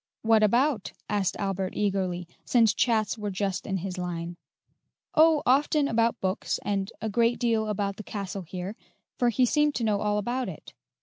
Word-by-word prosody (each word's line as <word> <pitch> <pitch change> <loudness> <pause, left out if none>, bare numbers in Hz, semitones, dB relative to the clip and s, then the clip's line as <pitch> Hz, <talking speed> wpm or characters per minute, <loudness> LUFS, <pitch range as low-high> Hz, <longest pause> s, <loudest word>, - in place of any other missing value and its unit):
"What 225 -1 +4
about?" 235 +2 +2 0.2
asked 200 -2 0
Albert 195 -1 -2
eagerly, 190 -4 -1 0.2
since 225 -4 +4
chats 220 -2 +1
were 210 -1 -2
just 195 -1 -2
in 195 -2 -1
his 185 0 -5
line. 175 -1 -4 0.8
"Oh, 315 -1 +5
often 285 +3 +3
about 230 -2 +1
books, 190 +1 -1
and 195 -1 -1
a - - 0
great 230 +3 +2
deal 225 -2 +1
about 200 -1 -2
the 215 - -7
castle 200 -2 -5
here, 185 +3 -6 0.4
for 245 - +4
he 250 +2 +3
seemed 295 +3 +2
to 235 - -1
know 210 -2 +1
all 210 0 +1
about 240 +5 -2
it. - - -10
210 Hz, 175 wpm, -27 LUFS, 195-235 Hz, 0.8 s, Oh